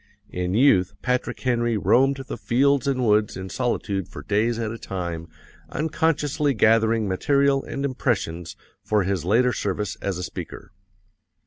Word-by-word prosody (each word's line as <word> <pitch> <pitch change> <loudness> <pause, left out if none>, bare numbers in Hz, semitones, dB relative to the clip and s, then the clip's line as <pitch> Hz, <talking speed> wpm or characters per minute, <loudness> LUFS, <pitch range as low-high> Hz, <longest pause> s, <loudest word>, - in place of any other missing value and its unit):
In 90 +1 -2
youth 100 -7 +4
Patrick 125 0 -1
Henry 120 -3 +1
roamed 135 +7 +2
the - - -4
fields 140 +2 +2
and 130 -2 +1
woods 105 -2 +2
in 95 0 -6
solitude 100 -6 -2
for - - -9
days 110 +3 +1
at 110 -2 -2
a 115 - -7
time 85 -4 -5 0.4
unconsciously 150 -2 0
gathering 110 0 +3
material 140 +8 +2
and 140 0 -3
impressions 100 - -2 0.3
for 105 -2 +1
his 95 -2 -2
later 120 +6 +3
service 100 0 -2
as 100 -3 -2
a 90 - -4
speaker. - - -8
115 Hz, 145 wpm, -24 LUFS, 95-135 Hz, 0.4 s, youth